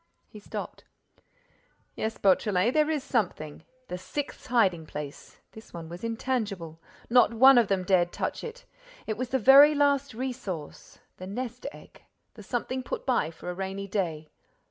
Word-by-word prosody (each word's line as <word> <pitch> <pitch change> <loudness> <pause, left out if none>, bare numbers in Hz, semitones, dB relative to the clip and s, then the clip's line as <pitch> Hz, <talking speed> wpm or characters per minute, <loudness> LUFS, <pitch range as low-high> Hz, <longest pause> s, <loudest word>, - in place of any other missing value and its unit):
He 210 - -12
stopped. 205 - -7 1.1
"Yes, 220 0 -3
Beautrelet, 195 +3 +2
there 305 0 +3
is 300 -4 -1
something—the 180 - -4
sixth 285 +9 -6
hiding 190 -10 +2
place! 145 -1 -8
This 220 -4 -13
one 165 -1 -7
was 175 +4 -9
intangible. 220 -8 -3 0.3
Not 240 -1 +4
one 265 +2 +8
of 230 - +2
them 190 -2 0
dared 175 -2 +2
touch - - -3
it. 485 +2 -8 0.4
It 215 - -2
was 250 +2 -4
the 265 - +1
very 275 +5 +8
last 280 -3 +2
resource, 230 - -6 0.2
the 185 - -8
nest 245 +5 -5
egg, - - -16 0.3
the 215 - -12
something 245 +4 -3
put - - -5
by 245 - +1
for 165 +2 -7
a - - -5
rainy 195 +2 -5
day. 165 -6 -3
220 Hz, 155 wpm, -27 LUFS, 180-255 Hz, 1.1 s, one